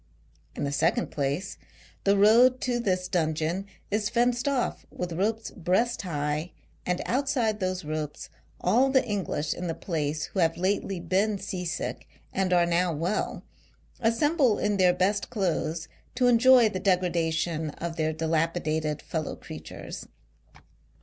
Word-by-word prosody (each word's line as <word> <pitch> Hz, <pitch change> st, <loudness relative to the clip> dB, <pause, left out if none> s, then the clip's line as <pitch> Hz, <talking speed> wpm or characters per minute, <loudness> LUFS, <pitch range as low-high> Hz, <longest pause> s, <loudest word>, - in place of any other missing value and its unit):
In -, -, -3 dB
the 140 Hz, -, -1 dB
second 165 Hz, -, +1 dB
place, 145 Hz, +6 st, -2 dB, 0.5 s
the 200 Hz, 0 st, +4 dB
road 235 Hz, +5 st, +6 dB
to 245 Hz, -1 st, 0 dB
this 185 Hz, -5 st, 0 dB
dungeon 165 Hz, +2 st, -1 dB, 0.2 s
is 210 Hz, 0 st, +1 dB
fenced 240 Hz, +2 st, +1 dB
off 270 Hz, -3 st, 0 dB
with 180 Hz, -1 st, -5 dB
ropes 215 Hz, +6 st, -1 dB
breast 190 Hz, +8 st, 0 dB
high, 150 Hz, -2 st, -2 dB, 0.3 s
and 180 Hz, 0 st, 0 dB
outside 250 Hz, -5 st, 0 dB
those 185 Hz, -3 st, -2 dB
ropes 155 Hz, -1 st, -4 dB, 0.3 s
all 265 Hz, +2 st, +3 dB
the 265 Hz, -1 st, +3 dB
English 180 Hz, -7 st, -2 dB
in 180 Hz, -, -5 dB
the 165 Hz, -, -2 dB
place 155 Hz, -3 st, -2 dB
who 195 Hz, -, -5 dB
have 165 Hz, -2 st, +2 dB
lately 190 Hz, 0 st, 0 dB
been 195 Hz, +5 st, +1 dB
sea 180 Hz, -1 st, -5 dB
sick 175 Hz, 0 st, -4 dB, 0.3 s
and 190 Hz, -1 st, 0 dB
are 175 Hz, -1 st, +5 dB
now 175 Hz, +1 st, +2 dB
well, 165 Hz, +6 st, -2 dB, 0.6 s
assemble 245 Hz, +1 st, +2 dB
in 210 Hz, -1 st, 0 dB
their 185 Hz, -2 st, +5 dB
best 200 Hz, +3 st, +1 dB
clothes 170 Hz, -6 st, -1 dB, 0.3 s
to 250 Hz, 0 st, +2 dB
enjoy 245 Hz, 0 st, +6 dB
the 190 Hz, -3 st, -3 dB
degradation 170 Hz, -4 st, 0 dB
of 165 Hz, +2 st, -5 dB
their 155 Hz, -1 st, 0 dB
dilapidated 160 Hz, -1 st, -1 dB
fellow 160 Hz, -2 st, -3 dB
creatures. -, -, -9 dB
180 Hz, 145 wpm, -27 LUFS, 160-215 Hz, 0.6 s, road